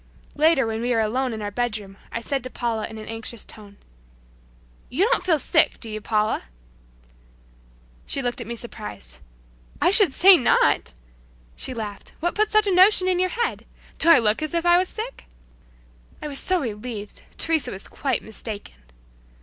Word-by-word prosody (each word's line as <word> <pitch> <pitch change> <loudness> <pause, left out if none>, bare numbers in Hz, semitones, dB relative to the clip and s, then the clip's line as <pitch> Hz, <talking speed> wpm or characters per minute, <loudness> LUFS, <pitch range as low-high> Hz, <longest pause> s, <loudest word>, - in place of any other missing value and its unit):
Later 305 -3 +3
when 225 0 -3
we 240 - -2
were 235 -2 +2
alone 250 +4 0
in 220 -2 -5
our 205 - -4
bedroom 210 -4 -3 0.2
I 230 - -4
said 270 +1 -3
to 255 - -5
Paula 230 -3 -3
in 220 - -10
an 215 - -8
anxious 225 0 -5
tone, 205 -2 -11 1.1
"You 320 +10 +1
don't - - +2
feel 340 -4 +2
sick; 280 - +2
do 225 - -7
you, 215 0 -5
Paula?" 215 - 0 1.6
She 275 - -2
looked 245 0 -2
at - - -7
me 235 - -4
surprised 210 - -8 0.6
"I - - +3
should 400 -6 +8
say 375 +6 +7
not!" 240 - +2 0.6
She 255 - -4
laughed, 210 -3 -7
"What 345 +1 -1
put 430 0 +1
such 430 0 +3
a 395 - +1
notion 370 +1 +6
in 365 -1 +1
your 370 0 +2
head? 470 +5 -3 0.3
Do 330 - +4
I 335 - +9
look 220 +2 +2
as 310 +2 -3
if 335 0 0
I 345 0 +6
was 370 - -1
sick?" 460 +3 -7 0.9
I - - -6
was 280 -2 0
so 370 -2 +3
relieved! 215 -3 -6 0.2
Teresa 320 -2 +1
was 190 - -6
quite 275 -2 -2
mistaken! 220 -1 -8
245 Hz, 180 wpm, -23 LUFS, 220-340 Hz, 1.6 s, I